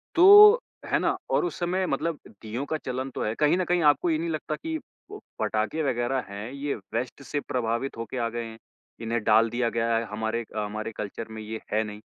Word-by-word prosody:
तो 415 +6 +9 0.3
है - - +1
ना? - - +1
और 365 - +2
उस 355 - -4
समय 185 +2 0
मतलब 155 +3 -1
दीयों 110 +6 -6
का 155 - 0
चलन 130 +1 -3
तो - - -2
है। 110 - -1
कहीं 155 +4 +4
न 185 - +1
कहीं, 175 -1 +1
आपको 150 +3 +4
ये 155 - +2
नहीं 165 +1 -3
लगता 155 -1 -3
कि 320 - -4 0.3
प 415 - -7 0.2
पटाखे 110 +8 -1
वग़ैरह 125 0 0
हैं, 105 +5 -6
ये 140 +1 -3 0.2
वेस्ट 125 +4 -3
से 145 +2 -2
प्रभावित 120 0 -2
होके 115 +2 -5
आ 115 -1 0
गए 120 0 -4
हैं, 110 0 -9 0.4
इन्हें 115 -1 -2
डाल 110 +1 +4
दिया 120 0 0
गया 115 0 0
है, 115 - 0
हमारे 110 +2 -2
अ, - - -1
हमारे 110 +2 -4
कल्चर 105 +2 -5
में 110 0 -7
ये 110 +1 -6
है 110 +1 +2
नहीं? 105 0 -8
120 Hz, 220 wpm, -26 LUFS, 110-155 Hz, 0.4 s, तो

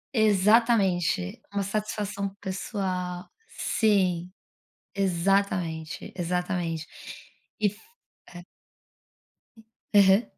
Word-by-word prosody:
Exatamente! 205 - +3
Uma 200 -1 -1
satisfação 200 -1 -2
pessoal. 185 -2 -3 0.2
Sim, 185 - +1 0.6
exatamente, 185 -4 0
exatamente. 175 -2 -2 0.7
E 210 - +3
f 210 +2 -5 0.5
é. 175 0 -10 1.5
Aham. 200 +2 +6
190 Hz, 65 wpm, -27 LUFS, 180-205 Hz, 1.5 s, Aham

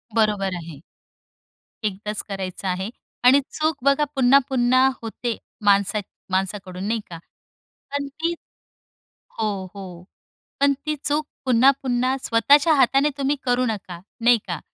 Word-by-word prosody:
बरोबर 205 -4 +1
आहे. 165 -4 -8 1.1
एकदाच 210 +1 -3
करायचं 195 -1 -5
आहे. 185 +2 -2 0.4
आणि 260 +3 +7
चूक 310 -1 -1
बघा 280 +1 +3
पुन्हा-पुन्हा 260 -1 +4
होते, 230 +1 -4 0.3
माणसा 200 +1 +3 0.3
माणसाकडून 190 -1 -2
नाही 225 0 0
का? 170 - -7 0.7
पण 285 0 -2
ती 325 +4 -2 1.1
हो, 220 -1 +1 0.3
हो. 195 -1 -7 0.8
पण 280 0 +5
ती 305 - 0
चूक 300 +1 0 0.2
पुन्हा-पुन्हा 255 0 +3
स्वतःच्या 285 +7 +4
हाताने 275 +2 +3
तुम्ही 280 +1 +1
करू 250 0 +2
नका. 195 -6 -5 0.2
नाही 240 0 +5
का. 175 -4 -4
240 Hz, 120 wpm, -23 LUFS, 195-275 Hz, 1.1 s, आणि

